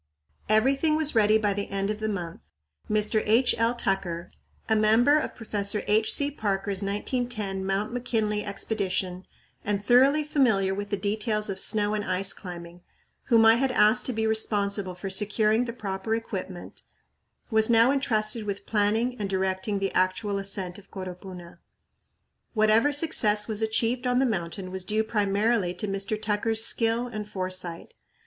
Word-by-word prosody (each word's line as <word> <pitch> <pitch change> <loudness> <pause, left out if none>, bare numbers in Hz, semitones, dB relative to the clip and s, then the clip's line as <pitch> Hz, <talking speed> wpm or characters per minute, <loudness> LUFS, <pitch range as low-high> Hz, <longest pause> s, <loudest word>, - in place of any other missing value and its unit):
Everything 270 +8 +3
was 310 -1 +3
ready 215 -1 +4
by 210 -2 0
the 200 0 -4
end 195 +1 -2
of 215 - -5
the 220 0 -2
month. 175 -5 -5 0.5
Mr. 215 +1 +2
H. 230 +4 +3
L. 230 +1 +2
Tucker, 180 -6 -3 0.4
a 220 - +2
member 225 +7 +4
of - - -5
Professor 210 -2 -2
H. 215 +1 +2
C. 285 0 +1
Parker's 200 -5 -2
1910 205 -1 -3
Mr. 195 +3 -2
McKinley 220 -4 -1
Expedition 190 -3 -3 0.4
and 205 0 -2
thoroughly 270 +6 +4
familiar 225 -11 +1
with 205 +1 -5
the 205 - -1
details 210 +1 -1
of 190 - -6
snow 210 0 +2
and 210 -1 -2
ice 190 0 0
climbing, 175 -2 -10 0.4
whom 230 -1 +4
I 225 +1 +6
had 270 +2 +1
asked 215 +1 +3
to 255 - -2
be 220 0 -1
responsible 205 -3 -1
for 190 +2 -6
securing 215 +3 +1
the 235 - -4
proper 205 -1 -3
equipment, 190 -5 -7 0.7
was 220 0 +3
now 230 +2 +5
entrusted 225 -5 0
with 200 -1 -4
planning 225 +4 0
and 200 -2 -3
directing 190 +1 -1
the 195 0 -2
actual 190 +2 0
ascent 195 -2 -3
of 195 - -20
Coropuna. 180 -2 -9 1.0
Whatever 215 +6 +3
success 220 -9 +3
was 220 -1 -2
achieved 230 +3 0
on 250 0 +1
the 265 - +3
mountain 185 -4 -3
was 190 -1 -6
due 215 +3 0
primarily 205 -2 0
to 210 - -3
Mr. 195 +2 -3
Tucker's 220 +1 +2
skill 230 +1 +1
and 215 -3 -7
foresight. 185 -3 -5
210 Hz, 160 wpm, -26 LUFS, 195-225 Hz, 1.0 s, I